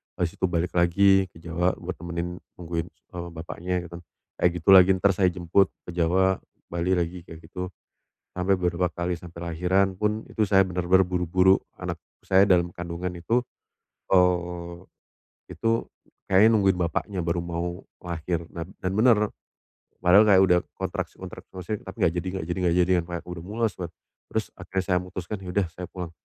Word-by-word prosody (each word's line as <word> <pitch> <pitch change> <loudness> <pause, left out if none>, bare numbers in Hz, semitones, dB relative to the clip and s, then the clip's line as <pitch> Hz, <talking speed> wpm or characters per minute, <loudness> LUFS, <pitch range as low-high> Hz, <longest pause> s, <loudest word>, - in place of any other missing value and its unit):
habis 85 -2 -1
itu 95 - +2
balik 85 0 -1
lagi 95 +2 +4
ke 80 - -18
Jawa 85 +2 -1
buat 90 +1 -5
nemenin, 85 +1 -4 0.2
nungguin, 85 -1 -3
eee, 85 +1 -9
bapaknya 85 +2 -4
gitu 85 0 -9
kan, - - -14 0.4
kayak 90 - +5
gitu 85 - -2
lagi. 95 -1 +8
Entar 100 +2 +3
saya 95 0 +3
jemput 90 +2 +2 0.2
ke - - -7
Jawa, 95 +2 +2 0.3
Bali 85 +2 +1
lagi 85 +1 -2
kayak 80 - -10
gitu. 90 +2 -5 0.7
Sampai 95 +2 +2
beberapa 90 0 0
kali 85 +1 -2
sampai 85 0 -7
lahiran 95 +3 +2
pun, 105 +3 -1
itu 110 - -2
saya 95 -1 +5
benar-benar 90 +1 +3
buru-buru 90 +1 +3 0.2
anak - - -5 0.3
saya 95 0 +5
dalam 85 -2 +3
kandungan 90 +1 -4
itu, 90 +8 0 0.7
eee, 90 -1 +2 0.8
itu 115 0 0 0.5
kayaknya 95 +4 +7
nungguin 95 -3 +3
bapaknya 90 +3 -1
baru 85 0 0
mau 85 +2 -4 0.2
lahir, 85 -1 -3
nan 85 +1 -6
dan 95 - -2
bener. 110 -2 +4 0.7
Padahal 95 +4 +6
kayak 95 -2 +7
udah 90 -1 +5 0.2
kontraksi - - -4
kontraksi, - - -10
maksudnya, 95 +3 -5
tapi 95 - -9
nggak 80 - +2
jadi 95 - -7
nggak 80 - -4
jadi 90 - -3
nggak 85 -1 +2
jadi, 95 - -1
kayak 85 0 -6
udah 90 -1 -6
mules 110 +2 -1
kan. 90 -2 -5 0.4
Terus, - - 0
akhirnya 95 0 -3
saya 90 -2 +2
mutuskan, 90 +2 -6
"Ya 90 - -7
udah 95 +1 +1
saya 90 +1 -6
pulang." 90 -3 -6
90 Hz, 175 wpm, -25 LUFS, 85-95 Hz, 0.8 s, lagi